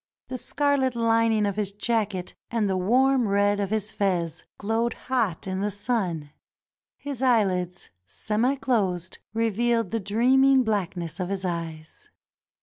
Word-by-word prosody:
The 255 -1 -4
scarlet 280 -3 +1
lining 230 -2 +3
of 200 0 -2
his 205 -2 -1
jacket 205 -3 -1 0.2
and 225 -3 0
the 190 - 0
warm 250 +6 +3
red 205 +1 +2
of 200 -2 -1
his 215 0 -1
fez 175 -5 -1
glowed 225 +3 0
hot 230 -10 -1
in 190 0 -2
the 205 - 0
sun. 190 -8 -2 0.7
His 280 -3 -6
eyehds, 190 -8 +1 0.2
semi 225 - 0
closed, 195 -10 -1 0.2
revealed 230 -1 +1
the 225 - 0
dreaming 255 +6 +4
blackness 180 -6 -2
of 180 0 -2
his 195 -1 -3
eyes. 165 - -5
210 Hz, 140 wpm, -26 LUFS, 185-235 Hz, 0.7 s, dreaming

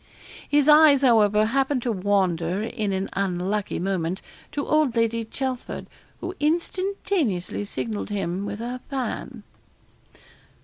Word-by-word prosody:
His 290 -1 +3
eyes, 300 -2 +7
however, 215 -4 +5
happened 270 +2 +1
to 240 - 0
wander, 185 -2 +1
in 220 -3 -2
an 190 0 -1
unlucky 195 +1 -1
moment, 185 -1 -2 0.3
to 285 -1 -2
old 305 -5 +2
Lady 230 0 +1
Chelford, 255 +2 -4 0.4
who 360 +1 -4
instantaneously 335 - -1
signalled 215 +1 -4
to 205 - -4
him 185 0 -2
with 205 0 -4
her 240 +3 -4
fan. 265 -3 -4
225 Hz, 125 wpm, -24 LUFS, 195-275 Hz, 0.4 s, eyes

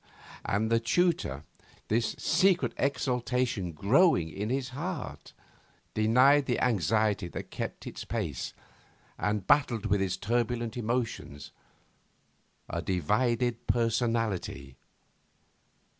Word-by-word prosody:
And 110 +3 0
the 115 - +4
tutor, 115 - +1 0.4
this 115 +1 0
secret 185 -1 +2
exultation 125 -7 -1
growing 100 - +3
in 105 +5 -4
his 130 0 -1
heart, 165 +7 -5 0.6
denied 130 +6 +4
the 125 - +1
anxiety 105 -2 +1
that - - -7
kept - - -5
it - - -6
pace, - - -3 0.6
and 105 -2 -1
battled 125 -6 +3
with 100 -1 +2
his 95 -1 -1
turbulent 120 +2 -1
emotions, 115 - -3 1.2
a - - -3
divided 115 - 0
personality. 115 - 0
115 Hz, 100 wpm, -29 LUFS, 100-125 Hz, 1.2 s, the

